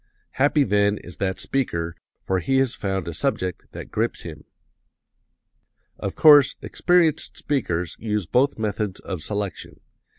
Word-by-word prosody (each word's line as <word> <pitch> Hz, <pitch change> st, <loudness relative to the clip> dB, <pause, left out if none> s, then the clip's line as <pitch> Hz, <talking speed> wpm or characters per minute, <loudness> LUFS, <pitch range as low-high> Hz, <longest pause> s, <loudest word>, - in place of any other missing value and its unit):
Happy, 145 Hz, +1 st, +4 dB
then, 105 Hz, -2 st, +2 dB
is 90 Hz, -5 st, -11 dB
that 95 Hz, +1 st, -2 dB
speaker, 85 Hz, -11 st, -2 dB, 0.3 s
for 95 Hz, -1 st, 0 dB
he 135 Hz, +10 st, +1 dB
has 130 Hz, -2 st, +2 dB
found 95 Hz, -4 st, -3 dB
a 85 Hz, -, -4 dB
subject 90 Hz, +3 st, -2 dB
that -, -, -9 dB
grips -, -, -1 dB
him. -, -, -9 dB, 1.5 s
"Of -, -, -4 dB
course, 145 Hz, -3 st, +7 dB
experienced 170 Hz, -4 st, +1 dB
speakers 90 Hz, -, -2 dB
use 105 Hz, -3 st, -2 dB
both 125 Hz, -, +2 dB
methods 105 Hz, -2 st, -2 dB
of 95 Hz, -5 st, -6 dB
selection. 100 Hz, 0 st, -5 dB
105 Hz, 135 wpm, -23 LUFS, 95-135 Hz, 1.5 s, course